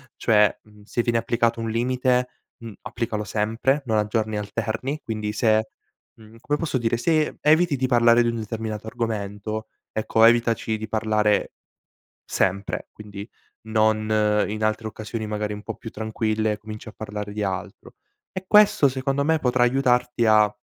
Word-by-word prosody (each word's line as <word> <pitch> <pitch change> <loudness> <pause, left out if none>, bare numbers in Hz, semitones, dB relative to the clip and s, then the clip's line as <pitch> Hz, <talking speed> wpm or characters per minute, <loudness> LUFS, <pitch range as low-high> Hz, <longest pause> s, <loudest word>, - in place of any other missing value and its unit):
Cioè, 105 -2 +3
mhmm, 105 -1 -19
se 115 +3 -1
viene 115 -1 +1
applicato 115 0 0
un 115 - -3
limite, 125 +1 +1 0.3
mhmm, 115 -2 -9
applicalo 110 -3 -3
sempre, 115 +7 0
non 110 -3 +1
a 105 -1 +1
giorni 110 -1 -1
alterni, 115 +7 -3
quindi 105 -2 -3
se, 110 0 +2 0.5
mhmm 110 0 -16
come 145 +5 -1
posso 160 -5 -1
dire, 120 -1 0
se 155 +5 +1
eviti 155 +1 +4
di 130 -1 0
parlare 120 -1 +5
di 120 - +1
un 115 - -2
determinato 110 -1 -5
argomento, 110 -1 -4 0.2
ecco 110 +1 +1
evitaci 115 -1 +3
di 110 0 -6
parlare 110 -1 +1 0.7
sempre, 95 +1 -1
quindi 105 0 -9 0.3
non 110 -1 +1 0.4
in 110 +1 -3
altre 110 +1 -1
occasioni 110 +1 -6
magari 105 0 -3
un 105 0 -7
po' - - -5
più 115 - -9
tranquille 110 0 -1
cominci 110 0 -9
a - - -10
parlare 105 -1 -6
di 105 +1 -3
altro. 95 -2 -5 0.4
E 185 - -5
questo 210 -8 +5
secondo 135 +1 -1
me 160 +2 +2
potrà 125 -2 +2
aiutarti 125 -1 +2
a 105 -1 +5
110 Hz, 160 wpm, -24 LUFS, 105-120 Hz, 0.7 s, parlare